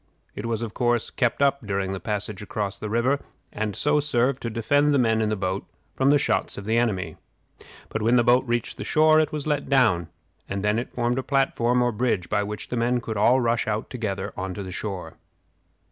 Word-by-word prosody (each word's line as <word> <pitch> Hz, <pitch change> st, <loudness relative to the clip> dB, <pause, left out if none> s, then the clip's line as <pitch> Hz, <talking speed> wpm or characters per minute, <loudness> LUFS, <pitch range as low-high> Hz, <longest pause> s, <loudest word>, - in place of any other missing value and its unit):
It 105 Hz, -, -5 dB
was, 115 Hz, 0 st, -2 dB
of 110 Hz, -2 st, -5 dB
course, 120 Hz, -2 st, 0 dB
kept 125 Hz, +2 st, +1 dB
up 140 Hz, -1 st, +2 dB
during 100 Hz, -2 st, -2 dB
the 95 Hz, -, -4 dB
passage 105 Hz, +1 st, -3 dB
across 100 Hz, -1 st, -4 dB
the 105 Hz, -, -5 dB
river, 120 Hz, +6 st, +1 dB, 0.3 s
and 105 Hz, -1 st, -2 dB
so 150 Hz, 0 st, +2 dB
served 135 Hz, -2 st, +1 dB
to 115 Hz, -, -3 dB
defend 145 Hz, +6 st, +2 dB
the -, -, +4 dB
men 110 Hz, -3 st, +2 dB
in 110 Hz, -, +1 dB
the 110 Hz, -, 0 dB
boat 95 Hz, 0 st, -2 dB, 0.3 s
from 135 Hz, +1 st, +2 dB
the 145 Hz, -, +6 dB
shots 95 Hz, -9 st, 0 dB
of 100 Hz, -, -7 dB
the 110 Hz, +2 st, +1 dB
enemy. 110 Hz, -6 st, 0 dB, 0.7 s
But 110 Hz, -, -4 dB
when 115 Hz, +3 st, +3 dB
the 120 Hz, -, +5 dB
boat 120 Hz, +2 st, +4 dB
reached 120 Hz, -1 st, -1 dB
the -, -, -5 dB
shore 155 Hz, 0 st, +4 dB
it 155 Hz, -1 st, +1 dB
was 150 Hz, -2 st, -4 dB
let 145 Hz, -2 st, -1 dB
down, 110 Hz, -, +3 dB, 0.4 s
and 100 Hz, 0 st, -3 dB
then 105 Hz, +2 st, +2 dB
it 120 Hz, -, -6 dB
formed 120 Hz, +1 st, 0 dB
a -, -, 0 dB
platform 125 Hz, -3 st, +1 dB
or 120 Hz, -, +2 dB
bridge 105 Hz, -6 st, -1 dB
by 105 Hz, -, +1 dB
which 105 Hz, +1 st, -5 dB
the 125 Hz, -, -2 dB
men 120 Hz, +1 st, +1 dB
could 115 Hz, -2 st, -5 dB
all 120 Hz, +5 st, +4 dB
rush 115 Hz, -2 st, +1 dB
out 110 Hz, 0 st, -2 dB
together 100 Hz, -5 st, -3 dB
to 95 Hz, +1 st, -4 dB
the 95 Hz, -, -7 dB
shore. 95 Hz, 0 st, -5 dB
115 Hz, 220 wpm, -25 LUFS, 105-125 Hz, 0.7 s, the